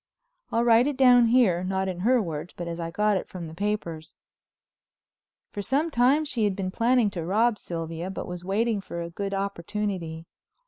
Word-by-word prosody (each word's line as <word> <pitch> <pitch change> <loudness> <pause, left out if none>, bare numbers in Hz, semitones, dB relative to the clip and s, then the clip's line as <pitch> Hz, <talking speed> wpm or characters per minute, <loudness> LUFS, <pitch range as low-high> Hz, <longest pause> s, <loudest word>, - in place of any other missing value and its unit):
I'll 230 - +2
write 235 +2 +5
it 290 -3 -2
down 245 -3 +6
here, 225 -8 +3
not 190 +1 -1
in 180 -2 -4
her 245 +7 +3
words, 160 -1 -6
but 175 - -5
as 170 0 -5
I 165 0 -3
got 210 +3 +1
it - - -5
from 180 -2 -7
the 160 - -9
papers. 170 -5 -4 1.4
For 205 - -4
some 290 +10 0
time 270 +5 +3
she 250 -6 -1
had 200 -2 0
been 185 -1 -3
planning 230 0 +2
to 170 -4 -4
rob 215 +6 +2
Sylvia, 165 +1 -5
but 190 - -5
was 180 0 -7
waiting 210 +3 0
for 170 -3 -6
a 170 - -7
good 195 +2 -3
opportunity. 190 -3 -3
195 Hz, 190 wpm, -26 LUFS, 170-235 Hz, 1.4 s, down